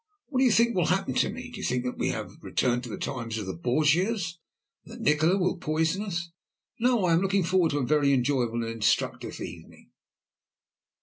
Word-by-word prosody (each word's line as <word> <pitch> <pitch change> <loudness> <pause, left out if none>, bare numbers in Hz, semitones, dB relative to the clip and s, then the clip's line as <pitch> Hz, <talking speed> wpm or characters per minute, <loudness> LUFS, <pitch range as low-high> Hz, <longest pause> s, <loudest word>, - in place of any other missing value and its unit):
What 260 -3 -1
do 265 - +5
you 250 - +5
think 235 +2 +3
will 180 -3 +2
happen 190 +2 0
to - - +2
me? 250 +2 -7
Do 240 - -8
you - - -6
think 125 0 0
that 125 - -4
we - - +1
have - - -4
returned 125 -1 0
to - - -8
the - - -5
times 115 -5 -4
of 105 - -4
the 95 - -4
Borgias, 165 - +1 0.4
and 230 - -12
that - - -11
Nikola 160 -1 +3
will 180 -1 0
poison 160 +3 0
us? 170 -5 -4 0.5
No, 240 -4 +2
I 170 - +3
am 165 - +3
looking 195 0 +1
forward 180 -1 +2
to - - 0
a 135 - 0
very 145 +1 +3
enjoyable 125 -3 +1
and 115 - -3
instructive 110 -3 -1
evening." - - -10
165 Hz, 210 wpm, -27 LUFS, 125-195 Hz, 0.5 s, do